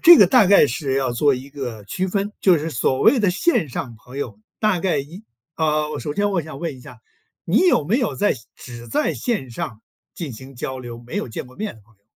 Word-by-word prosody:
这 345 0 +10
个 - - +8
大 250 -5 +6
概 200 -4 +7
是 135 +1 -2
要 135 -2 +1
做 140 +3 +3
一 130 +2 -7
个 125 -7 -6
区 185 - -2
分， 200 +2 -1
就 180 -4 +5
是 155 +2 -3
所 130 0 0
谓 270 - +5
的 200 -4 +3
线 195 - +1
上 120 -1 -5
朋 125 +5 -11
友 145 - -5 0.2
大 215 -4 +2
概 170 -3 +1
一 165 +10 -7 0.3
啊， 155 -1 +1
我 150 - -4
首 145 - -4
先 205 +2 +1
我 175 -4 0
想 155 -2 -9
问 165 -5 -3
一 125 - -14
下， - - -12 0.5
你 - - +3
有 350 - +4
没 210 - +2
有 240 -6 0
在 205 - +2 0.2
只 120 -1 -10
在 110 - 0
线 215 - -2
上 110 -1 -5 0.3
进 160 -7 -5
行 130 +4 -11
交 130 +1 -5
流， 120 -2 -8
没 120 - -6
有 - - -2
见 110 - -5
过 125 - -17
面 210 - -4
的 110 - -18
朋 115 +2 -27
友？ 100 - -44
145 Hz, 260 characters per minute, -22 LUFS, 125-195 Hz, 0.5 s, 这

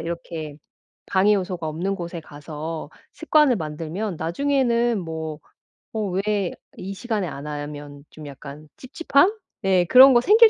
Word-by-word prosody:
이렇게 165 -3 -5 0.5
방해 200 +2 +4
요소가 180 -4 -2
없는 175 +6 -2
곳에 170 -1 -5
가서 155 +1 -7 0.3
습관을 305 -4 +4
만들면 165 +4 -4
나중에는 240 - +1
뭐 160 -2 -5 0.6
어 215 -2 -1
왜 195 0 0 0.2
이 195 +2 -6
시간에 215 -3 -2
안 140 -2 -7
하면 145 -1 -7
좀 155 - -11
약간 145 +2 -10
찝찝함? 285 +5 +2 0.3
예 185 -2 +4
그런 260 +6 +8
거 240 - +6
생길 440 - +7
180 Hz, 265 characters per minute, -23 LUFS, 155-220 Hz, 0.6 s, 그런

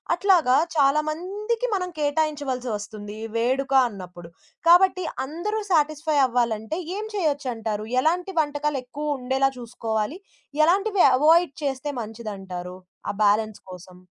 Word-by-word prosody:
అట్లాగా 350 -8 +4 0.2
చాలామందికి 355 - 0
మనం 365 -2 -2
కేటాయించవలసి 290 -4 -1
వస్తుంది, 205 0 -8
ఈ - - -4
వేడుక 265 +4 0 0.2
అన్నప్పుడు. 180 -4 -10 0.4
కాబట్టి 370 +1 +5 0.2
అందరూ 345 +10 -3
సాటిస్‌ఫై 310 -1 +1
అవ్వాలంటే 235 +4 -1 0.2
ఏం 430 - -4
చేయొచ్చంటారు? 250 - -2 0.2
ఎలాంటి 355 +6 0
వంటకాలు 290 -1 -2
ఎక్కువుండేలా 270 -1 -1
చూసుకోవాలి? 225 - -3 0.5
ఎలాంటివి 390 +3 +3
అవాయిడ్ 320 +2 +4
చేస్తే 275 +1 -2
మంచిదంటారు, 195 -5 -7 0.3
ఆ - - +1
బ్యాలెన్స్ 215 +1 +2
కోసం? 180 0 -12
280 Hz, 105 wpm, -24 LUFS, 220-330 Hz, 0.5 s, కాబట్టి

